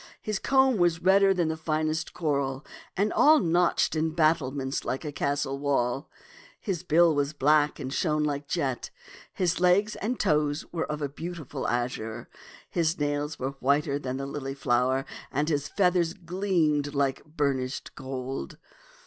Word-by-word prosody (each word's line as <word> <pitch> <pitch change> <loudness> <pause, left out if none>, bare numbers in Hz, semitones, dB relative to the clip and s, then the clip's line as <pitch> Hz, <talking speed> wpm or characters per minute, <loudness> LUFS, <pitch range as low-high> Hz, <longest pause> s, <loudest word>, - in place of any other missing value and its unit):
His 215 -2 -3
comb 265 -3 +3
was 170 -2 +2
redder 195 +1 +5
than 175 -4 +1
the 160 - -1
finest 155 0 -1
coral, 140 -4 -2 0.3
and 205 +3 +1
all 310 +1 +6
notched 175 -4 +2
in 160 0 -1
battlements 145 -4 +1
like 135 +5 -3
a 150 - -3
castle 140 -1 -1
wall. 135 -1 0 0.5
His 190 -7 -3
bill 170 -1 +4
was 145 0 0
black 150 +1 +3
and 130 0 -4
shone 150 -2 +1
like 145 -1 -2
jet, 135 -6 -2 0.4
his 180 -2 0
legs 185 +4 +3
and 235 +5 -2
his - - -2
toes 150 0 +1
were 165 -3 -2
of 150 0 -3
a - - +1
beautiful 150 -2 -6
azure, 120 -2 -3 0.4
his 165 -1 0
nails 145 +1 -1
were 130 +1 -2
whiter 140 +1 +1
than 130 -2 -4
the 135 - -4
lily 135 -1 -5
flower, 130 0 +1 0.3
and 150 +3 0
his 145 -2 0
feathers 180 -2 +1
gleamed 165 -6 0
like 140 -1 0
bur 150 -2 0
nished 130 0 -5
gold. 130 0 -5
150 Hz, 160 wpm, -27 LUFS, 140-170 Hz, 0.5 s, all